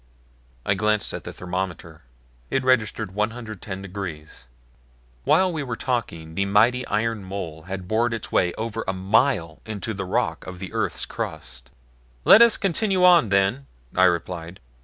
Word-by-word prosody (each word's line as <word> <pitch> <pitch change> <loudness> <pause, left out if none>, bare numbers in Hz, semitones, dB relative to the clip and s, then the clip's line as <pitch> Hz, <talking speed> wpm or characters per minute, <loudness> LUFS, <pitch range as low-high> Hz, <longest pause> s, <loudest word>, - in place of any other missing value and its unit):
I - - +3
glanced 105 +1 0
at - - -6
the - - -5
thermometer. 90 -3 -5 0.5
It 135 - 0
registered 110 -5 +1
110 105 -3 -4
degrees. 90 -9 -7 0.8
While 185 -1 +4
we 155 - -2
were 125 -4 -3
talking 85 -12 -3
the 100 +4 0
mighty 115 +6 +3
iron 110 -1 -1
mole 85 -5 -6
had 95 -1 -5
bored 115 +4 +1
its 115 -2 -4
way 90 - +2
over 115 0 -3
a 95 - 0
mile 95 - +1
into 110 0 -5
the 95 -1 -4
rock 90 - -1
of 90 -1 -7
the 95 +3 -8
earth's 100 -6 -1
crust. - - -6 0.6
"Let 220 - +9
us 235 -1 +7
continue 195 0 +1
on, 175 - +6
then," 100 +8 +1 0.3
I 95 - +5
replied. 85 0 -1
100 Hz, 155 wpm, -24 LUFS, 90-115 Hz, 0.8 s, Let